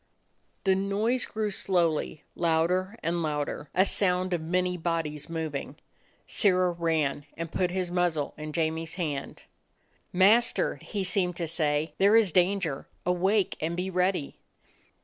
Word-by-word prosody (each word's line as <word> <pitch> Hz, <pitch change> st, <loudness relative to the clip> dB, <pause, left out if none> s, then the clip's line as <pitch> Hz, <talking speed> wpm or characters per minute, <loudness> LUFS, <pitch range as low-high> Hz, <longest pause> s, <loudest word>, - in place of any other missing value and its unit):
The 190 Hz, -, +4 dB
noise 205 Hz, +6 st, 0 dB
grew 215 Hz, -1 st, -2 dB
slowly, 170 Hz, -6 st, 0 dB
louder 180 Hz, +5 st, +1 dB
and 170 Hz, +1 st, 0 dB
louder; 150 Hz, -1 st, -3 dB
a 190 Hz, +2 st, +5 dB
sound 185 Hz, -2 st, +1 dB
of 170 Hz, -, 0 dB
many 180 Hz, +2 st, 0 dB
bodies 165 Hz, -3 st, -3 dB
moving. 160 Hz, -4 st, -4 dB, 0.5 s
Sirrah 185 Hz, -2 st, +2 dB
ran 160 Hz, -4 st, -1 dB
and 165 Hz, -1 st, -5 dB
put 180 Hz, -1 st, 0 dB
his 180 Hz, -1 st, -2 dB
muzzle 175 Hz, -5 st, 0 dB
in 155 Hz, 0 st, -6 dB
Jamie's 160 Hz, 0 st, -2 dB
hand. 150 Hz, -6 st, -4 dB, 0.7 s
"Master," 210 Hz, +6 st, +4 dB
he 205 Hz, -3 st, -4 dB
seemed 180 Hz, -1 st, +1 dB
to 170 Hz, -, -2 dB
say, 155 Hz, -1 st, 0 dB
"there 200 Hz, +3 st, +5 dB
is 220 Hz, -5 st, +5 dB
dan 185 Hz, +4 st, +3 dB
ger! 150 Hz, -7 st, -4 dB, 0.2 s
Awake 185 Hz, +3 st, +1 dB
and 165 Hz, +2 st, -2 dB
be 185 Hz, +1 st, -2 dB
ready." 180 Hz, -4 st, 0 dB
175 Hz, 140 wpm, -28 LUFS, 160-190 Hz, 0.7 s, a